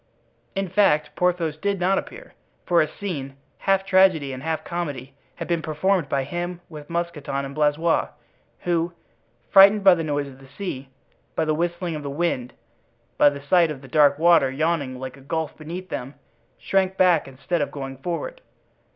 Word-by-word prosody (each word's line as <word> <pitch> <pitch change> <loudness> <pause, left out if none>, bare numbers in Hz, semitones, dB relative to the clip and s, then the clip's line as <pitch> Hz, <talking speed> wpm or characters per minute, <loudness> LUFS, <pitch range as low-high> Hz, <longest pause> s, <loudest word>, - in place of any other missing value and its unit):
In 195 0 -1
fact, 180 -5 +2
Porthos 175 -4 0
did 200 +3 -1
not 190 +2 +2
appear; - - -11 0.3
for 175 -2 +4
a 155 - +1
scene, 145 -6 -6 0.2
half 195 0 +1
tragedy 185 -8 +4
and 130 - -7
half 160 0 -2
comedy, 145 -7 -5 0.2
had - - -6
been 170 -2 0
performed 160 +1 0
by 135 -1 0
him 175 +5 -4
with 150 -3 -10
Mousqueton 170 -5 -3
and 135 - -7
Blaisois, 155 +3 +2 0.5
who, 170 -1 0 0.6
frightened 200 +1 +7
by 190 -2 +8
the 165 -2 -1
noise 145 -2 -1
of 135 -1 -12
the 135 - -15
sea, 140 -3 -6 0.5
by 160 - +1
the 155 - +1
whistling 170 +1 -2
of 150 - -5
the 140 - -5
wind, 140 -5 -2 0.7
by - - +7
the 140 -1 -8
sight 170 +3 +4
of 145 -3 -6
that 135 - -13
dark 145 -3 +5
water 165 -4 +5
yawning 140 -2 -1
like 130 +1 -7
a - - -15
gulf 160 +2 -3
beneath 175 +4 -7
them, 130 +3 -5 0.4
shrank 190 -1 0
back 175 -6 +4
instead 140 +6 -3
of 145 - -1
going 135 -2 -7
forward. 180 - -4
160 Hz, 175 wpm, -23 LUFS, 140-180 Hz, 0.7 s, by